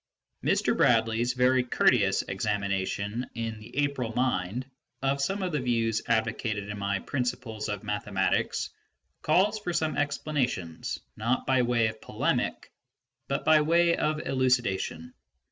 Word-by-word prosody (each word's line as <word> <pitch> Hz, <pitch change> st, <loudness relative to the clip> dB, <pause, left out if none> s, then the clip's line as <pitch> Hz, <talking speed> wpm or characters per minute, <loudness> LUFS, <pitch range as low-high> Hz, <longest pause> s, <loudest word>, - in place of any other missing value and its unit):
Mr. -, -, +2 dB
Bradley's 115 Hz, +1 st, +3 dB
very 125 Hz, +1 st, +4 dB
courteous 110 Hz, -5 st, +3 dB
examination 100 Hz, +3 st, -2 dB
in 115 Hz, -1 st, -4 dB
the 110 Hz, +5 st, -12 dB
April 140 Hz, -5 st, 0 dB
Mind 125 Hz, -2 st, 0 dB, 0.4 s
of 140 Hz, +1 st, +1 dB
some 195 Hz, +7 st, -1 dB
of 180 Hz, -, -1 dB
the 150 Hz, -, 0 dB
views 115 Hz, -3 st, +1 dB
advocated 110 Hz, -2 st, 0 dB
in 105 Hz, 0 st, -5 dB
my 100 Hz, 0 st, 0 dB
Principles 120 Hz, -2 st, -3 dB
of 105 Hz, -1 st, -4 dB
Mathematics 105 Hz, -2 st, -1 dB, 0.5 s
calls 200 Hz, +7 st, +3 dB
for 175 Hz, -4 st, -3 dB
some 160 Hz, -2 st, 0 dB
explanations, 140 Hz, -, -2 dB, 0.2 s
not 115 Hz, +4 st, 0 dB
by 130 Hz, -1 st, +3 dB
way 120 Hz, -1 st, +2 dB
of 110 Hz, 0 st, -3 dB
polemic, -, -, -1 dB, 0.6 s
but 140 Hz, -, -2 dB
by 155 Hz, -1 st, +6 dB
way 170 Hz, +2 st, +4 dB
of 155 Hz, 0 st, 0 dB
elucidation. 120 Hz, -11 st, 0 dB
120 Hz, 130 wpm, -28 LUFS, 105-140 Hz, 0.6 s, by